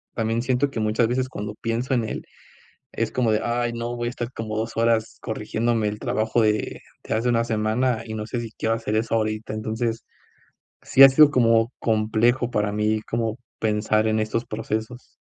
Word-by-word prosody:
también 115 0 0
siento 130 +3 +1
que 115 - -4
muchas 110 +2 +2
veces 130 +1 0
cuando 105 -3 -6
pienso 115 +3 -1
en 120 -3 +1
él, - - -4 0.7
es - - -1
como 120 -3 +1
de: 105 - +2
"Ay 120 0 0
no, 120 +1 -4
voy 120 0 -2
a - - -2
estar 120 -1 -5
como 110 -3 -5
2 110 +1 -2
horas 115 -1 +1
corrigiéndome 115 -1 -1
el 105 0 -5
trabajo 110 +2 0
de 105 -1 0 0.2
de - - -2
hace 115 +3 0
una 115 -1 +2
semana 115 +2 0
y 110 - -6
no 105 -1 -4
sé 120 +2 -3
si 115 -1 -6
quiero 115 - +1
hacer 115 -1 -2
eso 115 +1 0
ahorita". 110 -1 -1
Entonces, 110 +1 -3 0.8
sí, 135 - +6
ha 135 - +11
sido 145 +2 +7
como 115 -2 +3
complejo 115 +3 +1
para 105 -3 0
mí 105 +1 0
como 115 +1 -2 0.2
pensar 110 0 +1
en 110 0 +1
estos 110 +2 -1
procesos. 110 +2 -5
115 Hz, 190 wpm, -24 LUFS, 110-120 Hz, 0.8 s, ha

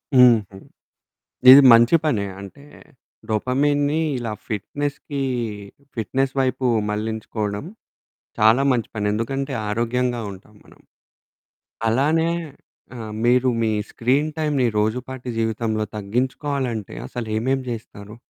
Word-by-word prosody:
హుహు. 115 -6 +5 0.9
ఇది 135 +2 +11
మంచి 120 +7 +6
పనే. 115 -10 +1 0.2
అంటే 120 +9 -11 0.6
డొపమీన్‌ని 145 +7 +1 0.2
ఇలా 115 -3 -4 0.2
ఫిట్నెస్‌కి, 140 +6 -4 0.7
ఫిట్నెస్ 130 +4 -1
వైపు 130 0 -1 0.3
మళ్లించుకోవడం, 105 0 -3 0.8
చాలా 110 +5 +5
మంచి 120 -3 -1
పని. 105 -1 -2
ఎందుకంటే 135 +5 -3 0.2
ఆరోగ్యంగా 120 +2 -1
ఉంటాం 100 +3 -14
మనం. - - -20 1.1
అలానే 155 +8 +2 0.7
ఆ! - - -7 0.3
మీరు 125 +1 +4
మీ 110 - +1 0.2
స్క్రీన్ 135 +6 +1
టైమ్‌ని 150 -5 +1
రోజుపాటి 125 +4 -2
జీవితంలో 110 -1 -1
తగ్గించుకోవాలంటే 125 +2 -2
అసలు 120 -2 -6
ఏమేం 130 +4 0
చేస్తారు? 105 -2 -8
120 Hz, 100 wpm, -22 LUFS, 110-135 Hz, 1.1 s, ఇది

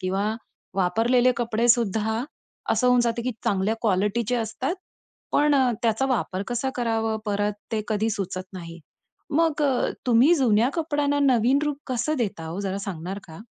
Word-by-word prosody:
किंवा 195 +4 -1 0.4
वापरलेले 230 +7 +3
कपडे 235 0 0
सुद्धा 220 0 +2 0.5
असं 250 - +2
होऊन 250 0 +5
जाते 235 0 0
की 255 - -1
चांगल्या 200 +2 +1
क्वालिटीचे 210 +3 +1
असतात 235 - -2 0.6
पण 295 0 +4
अ, 260 -3 +4
त्याचा 230 +3 +1
वापर 200 -6 -1
कसा 245 +2 -1
करावं 225 -2 0
परत 205 0 0 0.2
ते 215 - 0
कधी 220 0 0
सुचत 190 -2 -3
नाही. 170 -2 -9 0.5
मग 315 0 +1
अ, 270 -4 +1 0.2
तुम्ही 250 +8 +5
जुन्या 240 -6 +3
कपड्यांना 290 -3 0 0.2
नवीन 245 +4 +3
रूप 295 -2 -1
कसं 255 +4 -1
देता 195 -8 -2
हो 170 +5 -4
जरा 195 -1 -2
सांगणार 195 -1 -5
का? 160 - -10
225 Hz, 155 wpm, -25 LUFS, 200-255 Hz, 0.6 s, होऊन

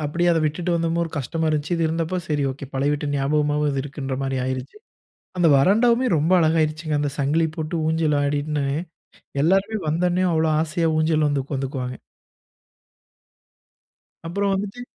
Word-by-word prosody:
அப்படியே 175 +4 0
அதை 165 - +2
விட்டுட்டு 165 +4 -1
வந்தப்போ 165 0 0
ஒரு 165 - -7
கஷ்டமா 160 +5 -2
இருந்துச்சு. 155 +3 -1
இது 165 - -1
இருந்தப்போ, 165 +2 -2
சரி, 150 -2 0
ஓகே! 140 +2 -8
பழைய 140 +2 +1
வீட்டு 150 0 -2
ஞாபகமாவாவது 145 0 +1
இருக்குன்ற 140 -1 -5
மாரி 135 0 -2
ஆயிருச்சு. 130 - -4 0.6
அந்த 175 -2 +4
வராண்டாவுமே 235 - +4
ரொம்ப 160 +5 +1
அழகாயிருச்சுங்க, 155 -1 +1
அந்த 145 - -1
சங்கிலி 150 +4 +2
போட்டு, 155 0 -4
ஊஞ்சல் 160 -2 +1
ஆடிட்ன்னு, 145 0 -1 0.8
எல்லாருமே 195 +6 +2
வந்தோன்னே, 175 +3 +1
அவ்ளோ 160 0 +2
ஆசையா 165 +1 0
ஊஞ்சல்லவந்து 155 -3 +1
உக்காந்துக்குவாங்க. 130 -2 -4 2.3
அப்புறம் 200 +3 0
வந்துட்டு 200 +5 -4
155 Hz, 135 wpm, -23 LUFS, 145-170 Hz, 2.3 s, அந்த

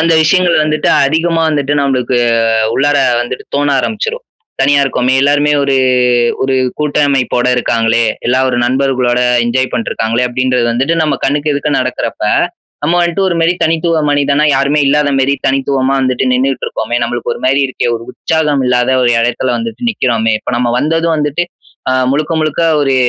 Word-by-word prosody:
அந்த 165 +1 +2
விஷயங்கள் 175 +2 +2
வந்துட்டு, 155 0 -1 0.2
அதிகமா 165 +2 0
வந்துட்டு, 145 -1 -1
நம்பளுக்கு 130 -2 0 0.6
உள்ளார 145 +1 +1 0.2
வந்துட்டு 120 +1 -5
தோண 145 0 +1
ஆரம்பிச்சுரும். 460 - -4 0.4
"தனியா 140 +1 +3
இருக்கோமே, 130 0 0
எல்லாருமே 145 +1 +2
ஒரு 135 -1 +1 0.7
ஒரு 135 0 0 0.2
கூட்டமைப்போட 140 -4 0
இருக்காங்களே, 115 -1 +1 0.2
எல்லா 125 +2 +2
ஒரு 120 - -1
நண்பர்களோட, 130 -1 0 0.3
என்ஜாய் 130 +2 -1
பண்ட்டு 115 - -2
இருக்காங்களே" 115 +3 -1
அப்படின்றது 125 -1 0
வந்துட்டு, 135 +8 0
நம்ம 155 - 0
கண்ணுக்கு 145 +2 0
எதுக்க 145 +1 -2
நடக்குறப்ப, 130 -1 -3 0.6
நம்ம 170 +3 +1
வந்துட்டு 170 +3 -1
ஒரு 170 - -1
மாரி 165 +2 +3
தனித்துவ 165 +1 0
மனிதனா, 145 +1 +1
யாருமே 140 +2 +1
இல்லாத 145 +1 +2
மாரி, 135 +1 +1
தனித்துவமா 135 0 0
வந்துட்டு 130 0 0
நின்னுட்டு 130 0 0
இருக்கோமே, 120 - -3
நம்மளுக்கு 120 0 -3
ஒரு - - -8
மாரி 135 +2 +2
இருக்கே, 130 - -3
ஒரு 115 - -10
உற்சாகம் 150 -4 -1
இல்லாத 125 0 +1
ஒரு 120 - +2
எடத்தில 120 +2 -1
வந்துட்டு 230 +1 -5
நிக்கிறோமே, 115 - 0
இப்ப - - -5
நம்ம 120 -1 0
வந்ததும் 165 +2 0
வந்துட்டு, 150 +3 -1 0.5
அ - - +1 0.2
முழுக்க 155 +3 -1
முழுக்க 155 +2 -1 0.2
ஒரு, 135 -2 +1
140 Hz, 160 wpm, -13 LUFS, 125-150 Hz, 0.7 s, தனியா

